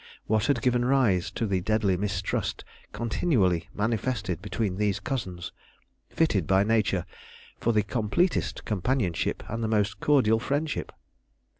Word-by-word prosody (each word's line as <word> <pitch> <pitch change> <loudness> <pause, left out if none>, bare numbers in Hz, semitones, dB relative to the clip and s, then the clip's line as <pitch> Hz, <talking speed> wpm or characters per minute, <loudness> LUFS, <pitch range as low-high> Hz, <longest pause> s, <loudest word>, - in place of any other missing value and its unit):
What 110 0 +1
had 145 - +1
given 125 -1 +2
rise 120 -9 +2
to 115 - -2
the 95 -3 0
deadly 105 -1 +1
mistrust 95 0 -2 0.3
continually 110 - +1
manifested 110 -4 -1
between 105 -2 -2
these 105 -1 +1
cousins, 95 - -4 0.6
fitted 110 - +1
by 95 +1 +4
nature 105 -4 +1 0.5
for 120 - +1
the 105 -2 +2
completest 120 - 0
companionship 105 -3 -1
and 115 +1 -3
the - - +1
most 105 -1 0
cordial 125 -7 +3
friendship? 145 +5 -2
110 Hz, 130 wpm, -27 LUFS, 95-125 Hz, 0.6 s, by